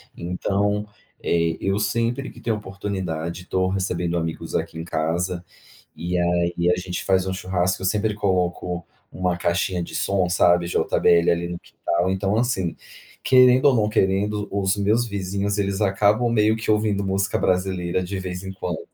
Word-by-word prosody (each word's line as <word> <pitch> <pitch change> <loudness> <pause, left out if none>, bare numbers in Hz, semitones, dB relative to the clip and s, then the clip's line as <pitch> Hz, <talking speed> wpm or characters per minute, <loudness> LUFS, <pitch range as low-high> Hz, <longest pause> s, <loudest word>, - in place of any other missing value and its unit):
Então, 100 +4 -1 0.3
eh, 85 -1 +1
eu 95 +1 0
sempre 115 +6 -1
que - - -14
tenho 115 -2 -1
a - - -5
oportunidade, 95 -4 -4
tô 95 0 0
recebendo 90 -2 -1
amigos 80 -1 -4
aqui 80 - -2
em 80 - -5
casa 85 +3 -1 0.5
e 90 +1 -3
aí 85 0 +1
e 85 +1 +3
a 90 - +1
gente 90 0 -4
faz 95 -1 +2
um 95 - -1
churrasco, 95 0 -1
eu - - -2
sempre 105 +2 +1
coloco 90 -3 -1 0.3
uma 90 -1 -1
caixinha 85 0 0
de - - -8
som, 95 -2 +1
sabe, 85 0 +4
JBL 85 -1 +3
ali 85 0 -1
no 85 - -5
quintal. 85 +2 -2
Então, 95 +2 0
assim, 105 -8 0 0.5
querendo 130 +1 +6
ou 140 - +6
não 105 -2 +2
querendo, 105 0 +1
os 95 -1 +1
meus 105 +4 +2
vizinhos 100 0 -2
eles 100 0 -1
acabam 105 +4 +3
meio 110 -1 +3
que 110 0 -5
ouvindo 105 -2 +1
música 100 +1 0
brasileira 90 -1 0
de 95 +2 -4
vez 90 0 -5
em 95 - -5
quando, 90 -3 -4
95 Hz, 170 wpm, -23 LUFS, 90-105 Hz, 0.5 s, querendo